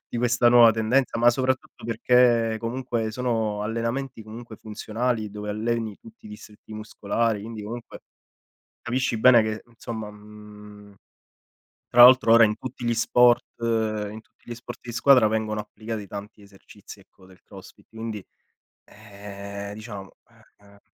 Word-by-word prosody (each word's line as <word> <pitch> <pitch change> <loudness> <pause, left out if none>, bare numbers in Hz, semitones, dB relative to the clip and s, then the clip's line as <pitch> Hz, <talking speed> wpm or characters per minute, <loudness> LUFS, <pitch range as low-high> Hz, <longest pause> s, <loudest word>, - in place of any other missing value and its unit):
di - - -6
questa 120 0 +3
nuova 120 -1 +7
tendenza, 115 +4 0
ma 120 +1 +5
soprattutto 130 0 -3
perché 115 -1 +2
comunque, 120 -1 -3
sono 110 -4 -2
allenamenti 115 +3 -3
comunque 110 +1 -11
funzionali, 110 +1 -3
dove 105 0 -6
alleni 110 0 -2
tutti 225 -1 -16
i - - -10
distretti 110 - -13
muscolari, 110 0 -2
quindi 110 -1 -8
comunque 115 +3 -8 0.8
capisci 125 0 -1
bene 120 0 +7
che, 110 0 -4
insomma, 115 -2 -7
mhmm, 105 -1 -14 0.9
tra 120 - +6
l'altro 125 -2 +7
ora 115 0 +8
in 105 -1 0
tutti 125 0 -8
gli 120 - +1
sport 120 +1 +4 0.2
in 110 -2 -2
tutti - - -36
gli - - -4
sport 120 +1 -10
di 120 -1 -8
squadra 130 -1 +5
vengono 110 0 -2
applicati 105 0 -7
tanti 105 +2 -9
esercizi, 100 0 -15
ecco, 95 -1 -22
del 95 -2 -20
crossfit - - -15
quindi, 110 -3 -7 0.6
ehm, 100 0 -9
diciamo 105 -3 -9 0.5
eh, 100 - -24
eh 100 0 -20
110 Hz, 145 wpm, -24 LUFS, 105-120 Hz, 0.9 s, ora